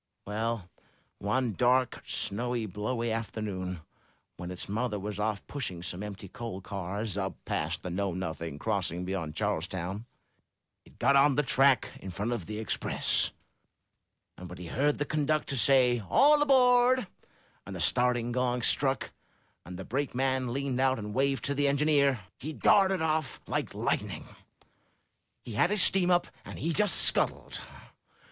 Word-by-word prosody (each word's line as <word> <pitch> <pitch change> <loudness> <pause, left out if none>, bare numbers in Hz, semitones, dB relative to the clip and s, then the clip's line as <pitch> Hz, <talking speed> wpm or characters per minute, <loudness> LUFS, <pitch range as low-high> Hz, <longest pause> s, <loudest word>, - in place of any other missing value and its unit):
*'Well, 110 -1 -2 0.5
one 120 +3 0
dark, 125 +4 +2
snowy, 120 +2 -2
blowy 110 +4 -3
afternoon, 100 -6 -4 0.5
when 90 +1 -7
his 90 0 -6
mother 110 +1 -2
was 105 +1 -5
off 105 -1 -2
pushing 95 -12 -5
some 90 +1 -5
empty 100 -1 -7
coal 110 0 -6
cars 100 +2 -4
up 95 0 -3
past 80 +3 -2
the 90 - -4
Know 100 +2 -1
Nothing 85 -4 -4
crossing 90 -2 -2
beyond 85 -5 -4
Charlestown, 95 +2 -3 0.8
he - - -19
got 140 - +1
on 140 0 +5
the 150 - +2
track 135 -2 +3
in 95 - -8
front 100 +6 -3
of 115 -9 -3
the 105 - -5
Express, 110 - +1 1.1
and 90 -1 -9
when 90 - -9
he 90 - -8
heard 140 - 0
the 145 - -1
conductor 150 -1 0
say 125 -2 +4
'All 295 +2 +5
aboard,' 255 -3 +4 0.6
and - - -6
the - - -6
starting 125 -1 +2
gong 125 -1 0
struck, 135 +1 +2 0.6
and 90 0 -7
the 95 - -7
brakeman 130 -1 -1
leaned 135 0 -2
out 130 0 +3
and 105 -1 -6
waved 135 +2 0
to 140 - 0
the 145 0 +1
en 140 0 +2
gineer, 140 -5 +3 0.2
he 155 +4 -5
darted 190 0 +3
off 155 -3 -1
like - - -3
lightning. - - -2 1.2
He 115 - -7
had 170 +12 +3
his 210 -1 +6
steam 185 -2 +4
up, 175 -1 +3 0.2
and - - -9
he 165 +1 -1
just 210 +4 +4
scuttled. - - +2
120 Hz, 155 wpm, -29 LUFS, 100-140 Hz, 1.2 s, his